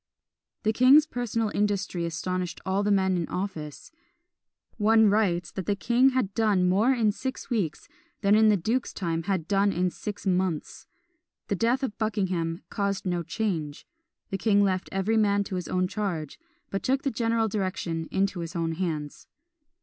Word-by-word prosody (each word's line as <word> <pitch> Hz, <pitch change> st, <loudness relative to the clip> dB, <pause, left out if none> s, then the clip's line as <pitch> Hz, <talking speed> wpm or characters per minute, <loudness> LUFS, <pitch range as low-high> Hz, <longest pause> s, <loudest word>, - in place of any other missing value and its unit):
The 220 Hz, -, +2 dB
king's 265 Hz, +6 st, +6 dB
personal 230 Hz, -6 st, -2 dB
industry 195 Hz, -4 st, -1 dB
astonished 180 Hz, +1 st, -3 dB
all 190 Hz, +1 st, +1 dB
the 205 Hz, -, 0 dB
men 190 Hz, -2 st, +3 dB
in 170 Hz, -3 st, -1 dB
office. 165 Hz, -6 st, -5 dB, 0.9 s
One 220 Hz, 0 st, +5 dB
writes 180 Hz, -5 st, +1 dB
that 190 Hz, -, -6 dB
the 205 Hz, -, +2 dB
king 240 Hz, +7 st, +3 dB
had 255 Hz, -7 st, -1 dB
done 205 Hz, -5 st, +2 dB
more 205 Hz, +8 st, +3 dB
in 230 Hz, -5 st, +2 dB
six 260 Hz, +4 st, -6 dB
weeks 200 Hz, -10 st, -2 dB, 0.3 s
than 200 Hz, -1 st, +3 dB
in 215 Hz, 0 st, +6 dB
the 210 Hz, -, +4 dB
duke's 230 Hz, +8 st, -1 dB
time 165 Hz, -3 st, -1 dB
had 190 Hz, +1 st, -1 dB
been 200 Hz, -, +1 dB
done 200 Hz, 0 st, +3 dB
in 180 Hz, -1 st, 0 dB
six 205 Hz, +3 st, -7 dB
months. 185 Hz, -4 st, -1 dB, 0.6 s
The 200 Hz, -, +1 dB
death 240 Hz, +6 st, +1 dB
of 220 Hz, -5 st, -3 dB
Buckingham 185 Hz, -6 st, -1 dB
caused 200 Hz, -2 st, -2 dB
no 175 Hz, -2 st, 0 dB
change; 165 Hz, -4 st, -3 dB, 0.5 s
the 195 Hz, -, -2 dB
king 205 Hz, 0 st, +3 dB
left 185 Hz, -2 st, 0 dB
every 195 Hz, +4 st, 0 dB
man 205 Hz, -2 st, +3 dB
to 195 Hz, -, -5 dB
his 180 Hz, -, -4 dB
own 185 Hz, 0 st, 0 dB
charge, 185 Hz, -7 st, -4 dB, 0.3 s
but 195 Hz, -, -2 dB
took 265 Hz, +1 st, 0 dB
the 275 Hz, -, 0 dB
general 230 Hz, 0 st, +1 dB
direction 185 Hz, -5 st, -3 dB
into 195 Hz, -1 st, 0 dB
his 170 Hz, +1 st, -6 dB
own 165 Hz, -1 st, -1 dB
hands. 160 Hz, -4 st, -4 dB
195 Hz, 170 wpm, -27 LUFS, 180-220 Hz, 0.9 s, king's